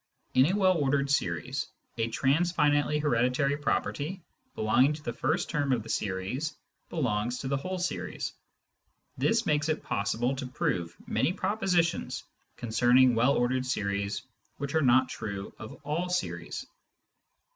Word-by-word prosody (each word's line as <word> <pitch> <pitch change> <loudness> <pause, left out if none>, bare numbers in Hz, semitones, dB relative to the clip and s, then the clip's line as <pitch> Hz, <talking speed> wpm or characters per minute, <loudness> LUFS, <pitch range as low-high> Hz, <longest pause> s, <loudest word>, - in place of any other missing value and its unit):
In 130 +2 +6
a 180 - +1
well 185 -4 +3
ordered 140 0 +1
series, 85 - 0 0.3
a 115 - +2
transfinitely 145 +3 +2
hereditary 140 0 +2
property 150 +4 -2 0.3
belonging 125 +7 +3
to 150 0 -9
the 120 - -3
first 150 +8 0
term 145 -5 0
of 120 -4 +1
the 115 - -11
series 105 +11 -2 0.3
belongs 120 -6 -1
to 135 - -4
the 140 +1 +1
whole 185 +7 -4
series. 180 +1 -3 0.9
This 225 0 +2
makes 150 0 +1
it 155 - -1
possible 120 +6 0
to 130 -1 -4
prove 85 -9 -2
many 175 - +1
propositions 180 -5 0 0.3
concerning 120 +2 +4
well 120 +5 +3
ordered 130 +1 +1
series 100 -4 -1 0.3
which 140 +1 -4
are 160 - +3
not 130 -1 +5
true 100 -5 -5
of 110 - -8
all 160 +5 -1
series. 180 0 -3
135 Hz, 140 wpm, -29 LUFS, 120-155 Hz, 0.9 s, In